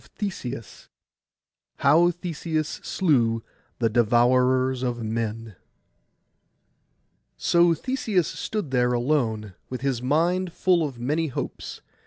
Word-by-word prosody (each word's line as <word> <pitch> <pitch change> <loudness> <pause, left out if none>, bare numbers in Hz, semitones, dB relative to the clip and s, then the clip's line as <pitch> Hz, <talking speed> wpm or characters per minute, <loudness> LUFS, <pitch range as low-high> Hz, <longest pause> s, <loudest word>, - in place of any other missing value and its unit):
PART 200 -3 -3
II 125 +1 -3 1.2
HOW 165 +5 +4
THESEUS 165 -3 -3
SLEW 120 - +1 0.3
THE 115 -2 +1
DEVOURERS 125 +3 +3
OF 120 -2 -2
MEN 110 -1 -3 1.8
So 170 -1 +4
Theseus 215 - 0
stood 210 -10 -4
there 125 -1 +2
alone, 120 -6 0 0.2
with 130 -1 -5
his 135 -3 -1
mind 170 +7 +1
full 180 -3 +2
of 135 -5 -4
many 150 +7 0
hopes. 135 - -6
130 Hz, 105 wpm, -25 LUFS, 120-170 Hz, 1.8 s, HOW